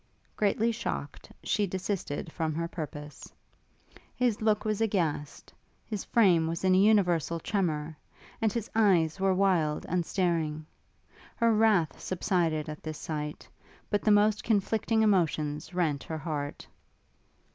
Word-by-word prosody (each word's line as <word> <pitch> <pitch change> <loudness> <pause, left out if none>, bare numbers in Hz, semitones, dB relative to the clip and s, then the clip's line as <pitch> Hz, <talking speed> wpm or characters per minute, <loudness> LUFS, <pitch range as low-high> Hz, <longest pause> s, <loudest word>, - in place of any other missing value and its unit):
Greatly 215 +2 +1
shocked, 145 -9 -5
she 205 -1 +1
desisted 185 -5 -3
from 160 -1 -2
her 170 +1 -2
purpose. 150 -3 -8 0.8
His 245 -4 0
look 215 -1 +1
was 215 0 -1
aghast, 170 -9 -2 0.3
his 210 -4 -4
frame 180 -8 +4
was 165 +2 -3
in 185 -1 +4
a - - +5
universal 175 -6 +3
tremour, 160 -6 -2 0.5
and 220 -1 +2
his 230 0 -3
eyes 190 -6 +3
were 190 -1 +2
wild 180 -6 +1
and 180 0 0
starting. 165 -4 -1 0.7
Her 230 -1 +3
wrath 210 -9 +2
subsided 170 -4 0
at 150 0 -7
this 155 -1 -6
sight, 150 -1 -5 0.4
but 205 -1 +1
the - - +1
most 210 0 +4
conflicting 220 +1 +1
emotions 155 -7 +1
rent 160 -6 0
her 160 - -4
heart. 145 -2 -4
180 Hz, 135 wpm, -29 LUFS, 155-210 Hz, 0.8 s, a